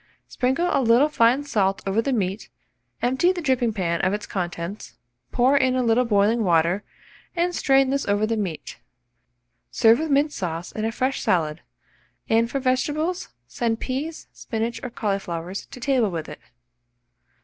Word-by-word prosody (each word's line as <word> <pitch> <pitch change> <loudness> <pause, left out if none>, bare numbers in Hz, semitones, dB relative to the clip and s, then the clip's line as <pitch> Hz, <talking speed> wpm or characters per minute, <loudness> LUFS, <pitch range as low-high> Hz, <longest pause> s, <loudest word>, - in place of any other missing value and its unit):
Sprinkle 265 +8 0
a - - +2
little 245 +5 +4
fine 250 0 +3
salt 195 -8 0
over 195 +3 +1
the 275 - -2
meat, 195 - -2 0.5
empty 265 +9 +3
the 370 - -4
dripping 255 -5 +1
pan 170 -5 -1
of 185 - +1
its 210 - -3
contents; 175 +1 -5 0.4
pour 255 +3 +3
in 260 -2 +3
a 255 - +1
little 235 +2 +3
boiling 215 +1 +2
water, 170 +2 +2 0.5
and 350 +1 0
strain 270 -4 +3
this 275 0 -1
over 205 +1 +2
the 225 +1 -1
meat. 190 -7 -5 0.9
Serve 225 +2 +4
with 320 0 -2
mint 285 +2 +3
sauce 170 -2 -4
and 220 0 -2
a - - -2
fresh 260 +3 -1
salad, 160 -3 0 0.7
and 230 +1 +2
for 275 - -2
vegetables 295 +7 -1 0.2
send 225 - -2
peas, 290 +5 -4
spinach, 230 0 -4
or 250 - -5
cauliflowers 195 -5 -4
to 255 - -11
table 250 -4 +1
with 165 -4 -5
it. 150 - -9
230 Hz, 160 wpm, -23 LUFS, 195-265 Hz, 0.9 s, little